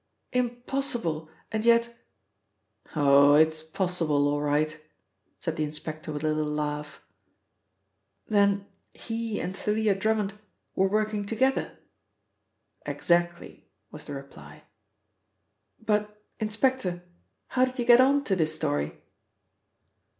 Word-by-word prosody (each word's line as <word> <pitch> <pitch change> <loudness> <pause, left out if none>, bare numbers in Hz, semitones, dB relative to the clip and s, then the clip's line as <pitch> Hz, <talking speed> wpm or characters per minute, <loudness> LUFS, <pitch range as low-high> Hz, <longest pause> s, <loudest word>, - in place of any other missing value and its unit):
Impossible! 240 - -1 0.2
And 220 0 -1
yet 235 0 +3 0.5
" - - -27
"Oh, 140 -1 +6
it 155 +1 +6
is 160 0 -4
possible 160 -3 0
all 145 0 0
right," 150 +1 0 0.6
said - - -3
the 155 - 0
inspector 155 +1 -5
with 150 0 -5
a 155 - +2
little 155 -1 -1
laugh, 150 0 -4 1.2
"Then 200 -1 +2 0.3
he 225 -2 -4
and 185 - -4
Thalia 210 +1 +1
Drummond 210 0 0 0.4
were 190 - +3
working 215 +1 0
together?" 260 +5 0 1.1
"Exactly," 175 -1 -1 0.2
was - - -10
the - - -6
reply. 75 - -11 1.2
"But, 210 -1 -1 0.2
inspector, 215 -4 0 0.5
how 255 0 +3
did 255 +1 -7
you 240 - -1
get 240 +1 +8
on 280 +2 +4
to 195 - 0
this 155 -3 +1
story?" 75 - -1
190 Hz, 115 wpm, -27 LUFS, 155-225 Hz, 1.2 s, get